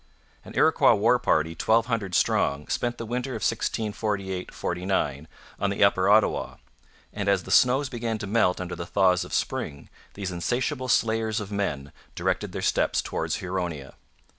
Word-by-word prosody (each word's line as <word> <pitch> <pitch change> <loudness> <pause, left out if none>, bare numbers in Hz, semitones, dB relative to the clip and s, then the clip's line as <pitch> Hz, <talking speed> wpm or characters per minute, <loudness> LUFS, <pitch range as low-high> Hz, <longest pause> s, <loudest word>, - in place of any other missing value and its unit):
An - - -11
Iroquois - - +5
war - - +3
party 80 +1 +1
twelve 110 +7 +2
hundred 110 -7 -2
strong 70 +1 +1
spent 120 0 -1
the 115 - -5
winter 125 +3 -3
of 110 - -5
1648 100 -4 -2
49 90 -5 -2 0.3
on 100 - +1
the 100 - +1
upper 100 -1 +3
Ottawa; 105 +1 +3 0.6
and 100 -1 -2
as 95 -2 +2
the - - -8
snows 130 +3 +4
began 115 -2 -3
to 105 - -5
melt 100 -3 +2
under 90 -1 -4
the 85 - -6
thaws 90 -2 +3
of - - -11
spring 70 0 -3 0.3
these 100 -2 -4
insatiable 125 - -2
slayers 110 -1 +1
of 105 -1 -7
men 75 -9 -3 0.2
directed - - -1
their - - -5
steps - - +1
towards - - -2
Huronia. 90 -7 -4
100 Hz, 165 wpm, -26 LUFS, 90-115 Hz, 0.6 s, Iroquois